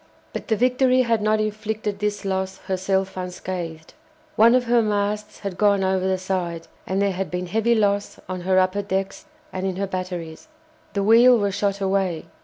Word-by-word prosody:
But -, -, -6 dB
the 220 Hz, -, +2 dB
"Victory" 255 Hz, +2 st, +3 dB
had 230 Hz, -2 st, +1 dB
not 215 Hz, +1 st, +2 dB
inflicted 215 Hz, -1 st, -3 dB
this 210 Hz, -1 st, -2 dB
loss 190 Hz, 0 st, -2 dB
herself 190 Hz, 0 st, -1 dB
unscathed. 180 Hz, -3 st, -6 dB, 0.4 s
One 230 Hz, +3 st, +6 dB
of 255 Hz, -, +3 dB
her 240 Hz, 0 st, +3 dB
masts 210 Hz, 0 st, -2 dB
had 200 Hz, -3 st, -5 dB
gone 200 Hz, -2 st, +3 dB
over 190 Hz, 0 st, +1 dB
the 190 Hz, 0 st, +1 dB
side, 180 Hz, -3 st, -3 dB, 0.2 s
and 190 Hz, +1 st, -1 dB
there 200 Hz, 0 st, +2 dB
had 190 Hz, 0 st, -3 dB
been 180 Hz, 0 st, -3 dB
heavy 225 Hz, +5 st, +1 dB
loss 205 Hz, -2 st, 0 dB
on 185 Hz, 0 st, -4 dB
her 185 Hz, +1 st, +1 dB
upper 185 Hz, +2 st, +2 dB
decks 195 Hz, -1 st, -3 dB, 0.3 s
and 185 Hz, -, -4 dB
in 190 Hz, -, -2 dB
her 200 Hz, +2 st, -1 dB
batteries. 180 Hz, -, -5 dB, 0.5 s
The 200 Hz, -, 0 dB
wheel 235 Hz, +4 st, +7 dB
was 200 Hz, -2 st, 0 dB
shot 200 Hz, 0 st, -1 dB
away. 190 Hz, -4 st, 0 dB
195 Hz, 185 wpm, -23 LUFS, 185-215 Hz, 0.5 s, wheel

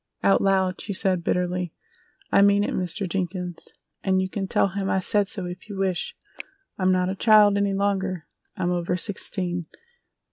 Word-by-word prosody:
Out 195 Hz, -, +4 dB
loud 190 Hz, -2 st, +1 dB
she 200 Hz, -, -4 dB
said 185 Hz, -2 st, 0 dB
bitterly: 180 Hz, -1 st, -1 dB, 0.6 s
"I -, -, +5 dB
mean 200 Hz, 0 st, +5 dB
it, -, -, -2 dB
Mr. 185 Hz, +2 st, -2 dB
Jenkins, 180 Hz, -1 st, -4 dB, 0.4 s
and 190 Hz, -1 st, +2 dB
you 190 Hz, -, 0 dB
can 195 Hz, -2 st, -3 dB
tell 195 Hz, -, +2 dB
him 195 Hz, 0 st, -3 dB
I 190 Hz, -, +2 dB
said 205 Hz, +2 st, +4 dB
so 190 Hz, -2 st, -2 dB
if 180 Hz, +4 st, -8 dB
you 200 Hz, -, -6 dB
wish. 190 Hz, -2 st, -2 dB, 0.6 s
I'm 185 Hz, -1 st, +1 dB
not 185 Hz, 0 st, +1 dB
a 190 Hz, -, -2 dB
child 210 Hz, -1 st, +5 dB
any 200 Hz, -1 st, +1 dB
longer, 195 Hz, -4 st, -1 dB, 0.3 s
I'm 175 Hz, -, 0 dB
over 175 Hz, 0 st, -1 dB
sixteen! 180 Hz, -2 st, -2 dB
190 Hz, 175 wpm, -24 LUFS, 180-200 Hz, 0.6 s, I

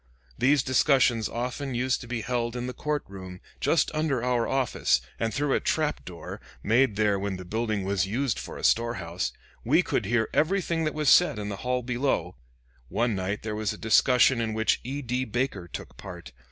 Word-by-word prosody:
These 140 Hz, -, +3 dB
discussions 130 Hz, -4 st, +3 dB
used -, -, -10 dB
often 125 Hz, +3 st, -3 dB
to 130 Hz, 0 st, 0 dB
be 120 Hz, -1 st, -3 dB
held 120 Hz, 0 st, -2 dB
in 125 Hz, 0 st, -3 dB
the 125 Hz, -, -4 dB
court 150 Hz, +3 st, -2 dB
room, 95 Hz, -1 st, -9 dB, 0.2 s
just 165 Hz, -, +2 dB
under 155 Hz, -6 st, 0 dB
our 125 Hz, -2 st, +1 dB
office, 130 Hz, -, +1 dB, 0.2 s
and 115 Hz, -1 st, 0 dB
through 140 Hz, +4 st, 0 dB
a -, -, +3 dB
trap 155 Hz, -2 st, 0 dB
door, 85 Hz, -2 st, -8 dB, 0.2 s
made 115 Hz, +1 st, +3 dB
there 105 Hz, -2 st, +2 dB
when 100 Hz, -1 st, -3 dB
the 90 Hz, -, -9 dB
building 110 Hz, +1 st, -1 dB
was 100 Hz, 0 st, 0 dB
used 120 Hz, +3 st, -1 dB
for -, -, -7 dB
a -, -, -9 dB
store 115 Hz, +1 st, +3 dB
house, 85 Hz, 0 st, -3 dB, 0.3 s
we -, -, +4 dB
could -, -, -1 dB
hear 115 Hz, -2 st, +2 dB
everything 165 Hz, -1 st, +1 dB
that 155 Hz, -, -2 dB
was 150 Hz, -2 st, +2 dB
said 175 Hz, -9 st, +5 dB
in 105 Hz, -1 st, -4 dB
the 100 Hz, -, -4 dB
hall 125 Hz, +2 st, -1 dB
below. 120 Hz, -8 st, -1 dB, 0.5 s
One 120 Hz, -1 st, +1 dB
night 95 Hz, +2 st, -3 dB
there 110 Hz, -1 st, -3 dB
was 105 Hz, -1 st, -1 dB
a -, -, -9 dB
discussion 125 Hz, +2 st, +4 dB
in 110 Hz, -1 st, -2 dB
which 110 Hz, 0 st, +2 dB
E. 140 Hz, +3 st, -4 dB
D. 125 Hz, +1 st, -1 dB
Baker 120 Hz, -6 st, -2 dB
took -, -, -9 dB
part. 85 Hz, -9 st, -9 dB
120 Hz, 200 wpm, -27 LUFS, 105-130 Hz, 0.5 s, said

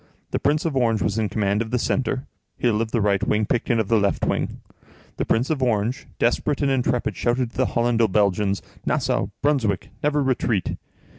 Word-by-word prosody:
The -, -, 0 dB
Prince 150 Hz, +3 st, +1 dB
of 160 Hz, -4 st, -1 dB
Orange 115 Hz, -6 st, +2 dB
was 105 Hz, +2 st, 0 dB
in 105 Hz, -2 st, 0 dB
command 100 Hz, 0 st, 0 dB
of 115 Hz, -, -3 dB
the 125 Hz, -, 0 dB
centre, 130 Hz, +2 st, -1 dB, 0.3 s
Hill 115 Hz, -3 st, +1 dB
of 115 Hz, -, -2 dB
the 115 Hz, 0 st, 0 dB
right 100 Hz, -1 st, +2 dB
wing, 105 Hz, +1 st, +1 dB
Picton 120 Hz, +1 st, 0 dB
of 110 Hz, -, 0 dB
the 115 Hz, +1 st, +3 dB
left 100 Hz, -1 st, +1 dB
wing. -, -, -1 dB, 0.6 s
The -, -, -1 dB
Prince 120 Hz, +7 st, +1 dB
of 145 Hz, -4 st, -1 dB
Orange, 120 Hz, +1 st, 0 dB
desperate 140 Hz, +4 st, +1 dB
and 140 Hz, -, +2 dB
intrepid, 125 Hz, -2 st, 0 dB
shouted 120 Hz, 0 st, 0 dB
to -, -, -15 dB
the 130 Hz, -, +3 dB
Hollando 115 Hz, -1 st, +2 dB
Belgians: 100 Hz, -1 st, +1 dB, 0.2 s
"Nassau! 95 Hz, -, 0 dB, 0.2 s
Brunswick! 130 Hz, -10 st, +1 dB
Never 150 Hz, -1 st, +1 dB
retreat!" 125 Hz, -6 st, 0 dB
115 Hz, 195 wpm, -23 LUFS, 105-130 Hz, 0.6 s, the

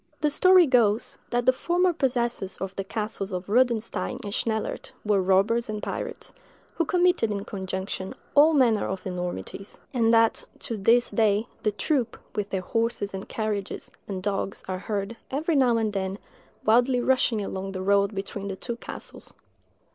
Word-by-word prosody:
The 300 Hz, -1 st, +2 dB
story 365 Hz, +4 st, +6 dB
goes, 235 Hz, -5 st, +2 dB
that 240 Hz, 0 st, 0 dB
the 255 Hz, -, +6 dB
former 355 Hz, +5 st, +1 dB
possessors 240 Hz, -, -1 dB
of 190 Hz, 0 st, -5 dB
the 195 Hz, -, -2 dB
castles 210 Hz, -1 st, -4 dB
of 180 Hz, 0 st, -3 dB
Rodenstein 235 Hz, +2 st, +1 dB
and 205 Hz, -1 st, -4 dB
Schnellert 220 Hz, -1 st, -2 dB
were 205 Hz, -2 st, +3 dB
robbers 200 Hz, +5 st, +2 dB
and 210 Hz, -1 st, -4 dB
pirates, -, -, -5 dB, 0.4 s
who 335 Hz, -, 0 dB
committed, 355 Hz, -, +3 dB
in 200 Hz, -1 st, -3 dB
conjunction, 190 Hz, -1 st, -4 dB, 0.2 s
all 305 Hz, +3 st, +6 dB
manner 235 Hz, -6 st, +3 dB
of 190 Hz, -1 st, -5 dB
enormities; 180 Hz, -, -5 dB
and 230 Hz, -3 st, +3 dB
that, 230 Hz, -1 st, +4 dB, 0.2 s
to 230 Hz, -, -4 dB
this 230 Hz, +4 st, +3 dB
day, 215 Hz, -1 st, +2 dB, 0.2 s
the 215 Hz, -, +1 dB
troop, 240 Hz, +3 st, -1 dB, 0.2 s
with 210 Hz, -1 st, -2 dB
their 190 Hz, -, -1 dB
horses 225 Hz, -1 st, -1 dB
and 190 Hz, 0 st, -6 dB
carriages, 210 Hz, -3 st, -3 dB, 0.2 s
and 190 Hz, -2 st, -4 dB
dogs, 195 Hz, 0 st, -2 dB
are 185 Hz, -1 st, -3 dB
heard, 200 Hz, +2 st, -3 dB
every 310 Hz, +4 st, 0 dB
now 250 Hz, -4 st, +4 dB
and 220 Hz, -2 st, 0 dB
then, 190 Hz, 0 st, -2 dB, 0.5 s
wildly 245 Hz, +3 st, +4 dB
rushing 245 Hz, -4 st, +2 dB
along 195 Hz, 0 st, -5 dB
the 185 Hz, -1 st, -4 dB
road 200 Hz, +1 st, +2 dB
between 195 Hz, +1 st, -5 dB
the 195 Hz, -, -3 dB
two 235 Hz, +4 st, -5 dB
castles. -, -, -9 dB
215 Hz, 165 wpm, -26 LUFS, 195-245 Hz, 0.5 s, story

